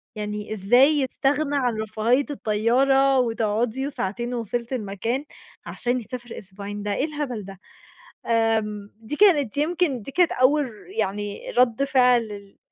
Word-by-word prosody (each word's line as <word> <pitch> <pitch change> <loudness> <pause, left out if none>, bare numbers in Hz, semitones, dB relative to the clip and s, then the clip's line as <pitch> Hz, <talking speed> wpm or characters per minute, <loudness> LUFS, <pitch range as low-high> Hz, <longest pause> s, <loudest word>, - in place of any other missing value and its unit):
يعني 210 0 -4
إزاي 245 +8 +5
يستغنى 280 +2 0
عن 245 -5 0
رفاهية 225 +5 +1
الطيارة 265 +4 +2
وتقعُدي 230 +2 0
وساعتين 240 -1 -3
ووصلتِ 235 +2 -3
المكان 230 +5 -3 0.4
عشان 245 0 -2
يسافر 240 +1 -8
أسبوعين، 200 +1 -8
ده 205 -1 -1
إيه 280 - 0
الهبل 285 -9 -4
ده؟! 195 -1 -11 1.0
آمم 210 -1 -7
دي 225 +6 -6
كانت 295 - +4
يمكن 310 -4 0
دي 275 - -9
كانت 355 +1 +3
أول 280 +3 +3
ر 215 - -16
يعني 205 +1 -3
رَد 250 +1 +3
فعل 250 -3 +4
ال 200 -2 -10
240 Hz, 135 wpm, -24 LUFS, 210-270 Hz, 1.0 s, إزاي